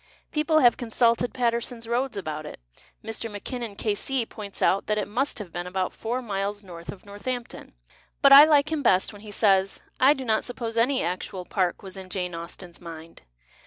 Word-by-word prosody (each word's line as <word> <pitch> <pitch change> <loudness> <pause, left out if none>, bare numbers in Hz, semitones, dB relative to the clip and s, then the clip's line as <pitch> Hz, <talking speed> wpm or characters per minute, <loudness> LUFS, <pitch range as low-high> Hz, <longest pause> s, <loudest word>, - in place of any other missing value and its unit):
People 310 +1 +2
liave 245 -4 +5
consulted 235 0 +2
Paterson's 235 -1 -1
Roads 245 +1 -1
about 155 -5 -4
it. - - -9 0.5
Mr. 225 +1 -4
Mackinnon, 220 +1 -5
K.C., 230 +5 -1
points 205 -3 -8
out 195 - +2
that 210 - +1
it 210 - -1
must 255 +7 -1
have 195 -6 -8
been 175 0 -4
about 185 0 -2
four 245 +3 -3
miles 205 -1 -3
north 170 -2 -8
of 200 - -14
North 205 +3 -11
ampton. 245 -2 -5 0.5
But 275 - +8
I 285 +2 +12
like 300 -1 +3
him 315 -2 0
liest 195 -5 +3
when 205 - -12
he 215 - -11
says, 195 -2 +2
" - - -39
I 275 +3 +6
do 265 - -6
not 220 -2 +1
suppose 235 -2 -5
any 255 +4 +2
actual 180 +1 -4
park 185 -1 -1
was 190 0 -9
in 190 -1 -9
Jane 180 -2 -3
Austen's 170 +1 -8
mind." 165 -1 -10
215 Hz, 200 wpm, -26 LUFS, 190-245 Hz, 0.5 s, I